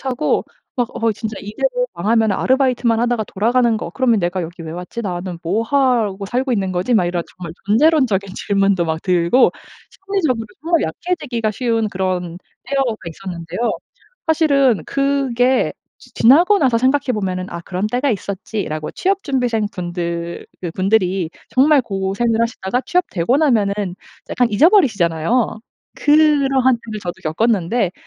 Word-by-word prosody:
타고 260 -2 0 0.3
막 245 -2 0
어 225 -1 +1
진짜 220 0 -5
이대로 - - -1
망하면은 220 +2 +2
'아르바이트만 250 -3 +2
하다가 240 -2 0
돌아가는 235 +3 +1
거 215 - -5
그러면 235 +1 +2
내가 175 0 -1
여기 170 +2 -8
왜 160 - -6
왔지? 180 +7 -6
나는 180 -3 -4
뭐 195 +7 0
하고 230 -6 +1
살고 255 +5 -1
있는 195 -4 -1
거지?' 185 +7 0
막 200 - +4
이런 175 -1 -1
정말 175 -3 -7
존재론적인 220 - +3
질문도 195 -3 +1
막 160 0 -2
들고 180 +6 +3 0.4
심리적으로 355 - -2 0.2
정말 335 0 +2
약해지기가 245 - -2
쉬운 225 -1 0
그런 185 -3 -3 0.3
때가 275 -1 0 0.2
있었는데요. 170 +2 -7 0.7
사실은 280 - +3
그게 265 -2 +1 0.3
지 - - -19
지나고 345 - +5
나서 255 -6 +2
생각해 260 +1 +1
보면은 185 -3 -2
'아 170 - -5
그런 185 +4 -3
때가 250 +5 0
있었지.'라고 200 -6 -4
취업 390 +1 0
준비생분들 180 - -2 0.2
그분들이 185 -1 0 0.2
정말 275 +1 +4
고생을 200 +3 -1
하시다가 230 0 -1
취업되고 260 - +1
나면은 205 - +1 0.4
약간 245 -2 +2
잊어버리시잖아요. 220 - +3 0.4
그러한 275 -4 +3
때를 215 -2 -6
저도 175 -3 -4
겪었는데 190 +3 0
225 Hz, 345 characters per minute, -19 LUFS, 185-260 Hz, 0.7 s, 지나고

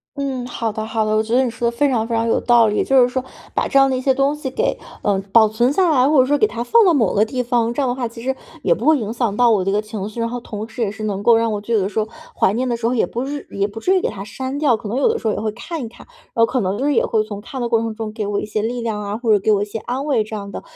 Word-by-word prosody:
嗯， 270 -3 -3
好 230 -2 -3
的 215 0 -4
好 220 0 -1
的。 215 0 +1
我 215 - +2
觉 225 +1 -4
得 260 - +4
你 255 - 0
说 235 0 -1
得 235 - -10
非 290 - +3
常 235 -5 0
非 230 - -1
常 225 0 0
有 225 - +1
道 235 -2 +5
理， 210 - +1
就 270 -1 +4
是 245 - +5
说 255 +1 -3 0.3
把 - - 0
这 - - +1
样 270 0 +5
的 260 - 0
一 255 - -2
些 265 0 +3
东 275 +2 +1
西 295 -3 -5
给， 450 - -1 0.3
嗯， 200 -2 +1
保 220 0 +6
存 235 +4 +1
下 360 +4 +2
来， 265 -2 +4
或 300 -2 +4
者 255 - +6
说 290 +2 +2
给 430 - +4
它 235 - -4
放 460 - +5
到 355 - +5
某 230 - +2
个 205 - +3
地 250 +3 -2
方， 235 -1 0
这 285 - -1
样 270 - +1
的 245 - -1
话 250 -2 -2
其 230 0 -11
实 265 +2 -1 0.3
也 - - +4
不 - - -5
会 315 -1 +5
影 220 -3 -4
响 230 -4 -1
到 245 -1 +5
我 205 -4 +2
这 195 - 0
个 205 +1 +1
情 215 -2 -6
绪。 215 - -8
然 230 - 0
后 245 +1 -4
同 215 -1 -6
时 235 +2 -7
也 210 -3 0
是 215 +1 -8
能 200 -2 -2
够 230 +1 +6
让 230 0 +1
我 205 - -3
就 230 +3 -1
有 - - +4
的 190 - 0
时 210 +2 -2
候 215 - -1 0.3
怀 - - +3
念 250 +4 -1
的 240 - 0
时 230 -1 -5
候 240 - 0
也 240 - +2
不 240 +3 -4
是 285 0 -6
也 200 0 0
不 210 +2 -8
至 370 +11 +2
于 370 - +2
给 - - 0
它 195 - -7
删 260 +6 -5
掉， 285 -5 +3
可 215 -1 -7
能 235 - -2
有 275 - +3
的 455 0 +1
时 225 - -3
候 215 - +2
也 - - -3
会 215 0 -2
看 290 +9 -6
一 - - -6
看， 225 - -15 0.3
哦， 230 -3 +4
可 255 - -1
能 210 +8 0
也 - - +2
会 220 -2 +1
从 210 -2 -7
看 245 +5 -7
的 240 - -1
过 230 -1 +3
程 225 0 -3
中 220 -1 -5
给 215 -1 -4
我 205 0 -1
一 - - -4
些 215 0 -2
力 240 +3 -2
量 220 -3 -3
啊， 205 +1 -4
或 230 -1 0
者 210 - +5
给 215 +3 +1
我 205 -1 +3
一 - - 0
些 210 +1 -6
安 250 +5 -4
慰 265 -7 +2
这 215 +1 -7
样 200 -1 -6
的， - - -6
230 Hz, 385 characters per minute, -20 LUFS, 215-260 Hz, 0.3 s, 保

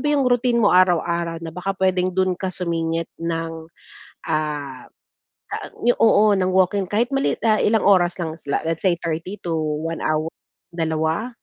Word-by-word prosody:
ba 295 - -3
yong 280 - +2
routine 245 -1 +2
mo 205 - +5
araw-araw, 170 -2 +2
na 165 - -5
baka 190 +2 -3
puwedeng 185 -1 +1
do'n 185 -1 +2
ka 190 - -2
sumingit 165 -2 -2
ng, 165 -1 -4 0.6
ah, 145 -4 -3 1.2
oo, 215 -2 +5
ng 185 -1 +1
walking? 190 +1 +2
Kahit 230 +4 +1
maliit 275 0 +1 0.3
ilang 220 +1 +2
oras 180 -3 +4
lang. 160 -2 -3
Is - - -21
la - - +1
let's 165 0 -2
say 175 -2 +3
30 170 +4 -4
to 170 - -1 0.3
1 165 0 -4
hour, 155 +1 0 0.4
2 160 +6 -1
175 Hz, 160 wpm, -22 LUFS, 165-195 Hz, 1.2 s, mo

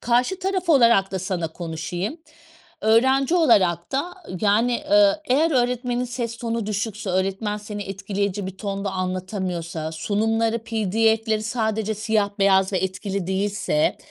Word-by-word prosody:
Karşı 245 +10 +1
taraf 375 -2 -2
olarak 235 -9 +5
da 190 - -1
sana 180 -3 -2
konuşayım, 175 - -5 0.6
öğrenci 265 +7 +3
olarak 190 - +3
da 285 +7 -1 0.3
yani, 220 +4 +3 0.2
eee, 310 -1 +6
eğer 305 +4 +2
öğretmenin 250 -2 0
ses 235 -1 -4
tonu 230 -2 -3
düşükse, 210 -1 -3
öğretmen 195 +3 -1
seni 210 0 -6
etkileyici 195 0 -3
bir 190 0 -7
tonda 200 -1 -3
anlatamıyorsa, 185 -3 -3
sunumları 225 +6 0
PDF'leri 220 0 +1
sadece 220 -1 -1
siyah 215 -1 0
beyaz 195 0 +3
ve 190 - +1
etkili 190 0 -3
değilse, 205 - 0
215 Hz, 130 wpm, -23 LUFS, 190-235 Hz, 0.6 s, eee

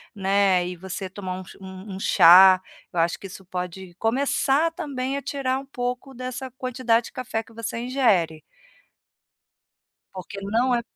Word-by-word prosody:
né, 195 -2 +2
e 180 - -5
você 190 +1 -6
tomar 185 -1 -6
um - - -8
ch - - -14
um 190 +1 -9
um 190 - -7
chá, 185 +1 +7 0.3
eu 175 - -1
acho 165 +1 +1
que 195 - -8
isso 190 +1 -11
pode 180 0 -6
começar 275 +6 +1
também 275 -4 -3
a - - -4
tirar 270 -2 -2
um 275 - -10
pouco 250 0 -4
dessa 255 +1 -6
quantidade 250 -2 0
de - - -10
café 230 -3 -3
que 225 - -19
você 230 0 -5
ingere. 220 - +1 1.7
Porque 190 +2 -8
não 235 +5 +1
é 235 - 0
220 Hz, 165 wpm, -24 LUFS, 185-255 Hz, 1.7 s, chá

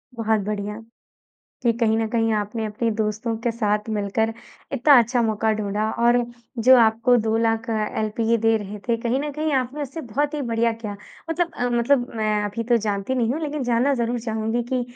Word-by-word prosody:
बहुत 220 -1 +1
बढ़िया, 210 +1 -4 0.8
कि 235 - +3
कहीं 220 -2 +2
न 225 - 0
कहीं 225 -1 +1
आपने 215 +2 -2
अपने 225 +2 -1
दोस्तों 215 +2 -1
के 235 - 0
साथ 210 -1 -1
मिलकर 220 +2 0 0.4
इतना 275 +1 +6
अच्छा 240 +2 0
मौका 220 0 +1
ढूँढ़ा 215 +1 -1
और 240 +1 +5 0.5
जो 260 +2 +8
आपको 230 +2 +4
2 220 -1 +1
लाख 225 0 0
अ, - - +1 0.3
एलपीए 225 +2 +1
दे 225 0 +3
रहे 210 0 -6
थे 230 - +3
कहीं 245 +3 0
न 295 0 -3
कहीं 305 +1 -2
आपने 265 +3 -1
उससे 280 +4 -6
बहुत 285 +4 -2
ही 290 - -2
बढ़िया 230 0 +2
किया 215 -3 -6 0.3
मतलब 340 +1 -1
अ, 245 - -1
मतलब 245 +1 +2
मैं 215 -1 0
अभी 205 +3 -3
तो 240 +1 +3
जानती 205 +2 -2
नहीं 240 -1 +1
हूँ, 315 - -3
लेकिन 295 -2 -3
जानना 245 +3 +2
ज़रूर 240 0 -1
चाहूँगी 225 +1 -2
कि 255 -1 +1
230 Hz, 195 wpm, -23 LUFS, 215-245 Hz, 0.8 s, जो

